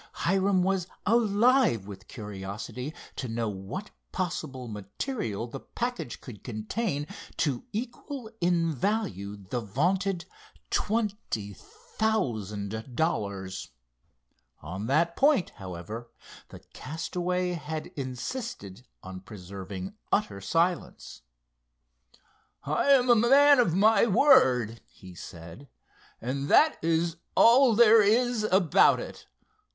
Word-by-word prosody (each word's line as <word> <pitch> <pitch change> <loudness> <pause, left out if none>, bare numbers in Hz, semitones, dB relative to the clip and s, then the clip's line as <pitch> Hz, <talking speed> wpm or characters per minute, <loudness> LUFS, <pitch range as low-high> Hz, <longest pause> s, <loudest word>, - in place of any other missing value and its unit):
Hiram 190 +1 +2
was 190 -2 0 0.2
alive 225 - +3
with 95 -2 -10
curiosity 105 +6 -6 0.3
to 130 - -3
know 115 0 -2
what 100 - -6 0.2
possible 150 -8 -4
material 105 - -4
the 130 +3 -8
package 240 - -5
could 105 -6 -11
contain 140 - -3 0.3
to 145 - -1
equal 240 +2 -6
in 170 -2 +2
value 145 - -2
the 100 +5 -4
vaunted 175 - 0 0.5
twenty 205 - -1
thousand 110 - -3
dollars. 100 - -2 0.9
On 95 +8 -5
that 165 +6 +2
point, 280 - +3
however, 95 +6 -7 0.4
the - - -12
castaway 180 +4 -2
had 155 -2 -5
insisted 130 - -6 0.2
on 95 0 -8
preserving 95 -1 -8 0.2
utter 100 -1 0
silence. 165 - -1 1.4
"I'm 250 - +3
a 240 - +7
man 275 +5 +6
of 175 -9 +3
my 215 +3 +5
word," 125 - +4
he 95 -1 -14
said, 85 +10 -11 0.5
"and 135 +4 -3
that 310 - +4
is 165 +1 +1 0.2
all 240 0 +6
there 225 -1 +7
is 235 +3 +2
about 190 -5 +4
it. - - -9
155 Hz, 105 wpm, -28 LUFS, -, 1.4 s, a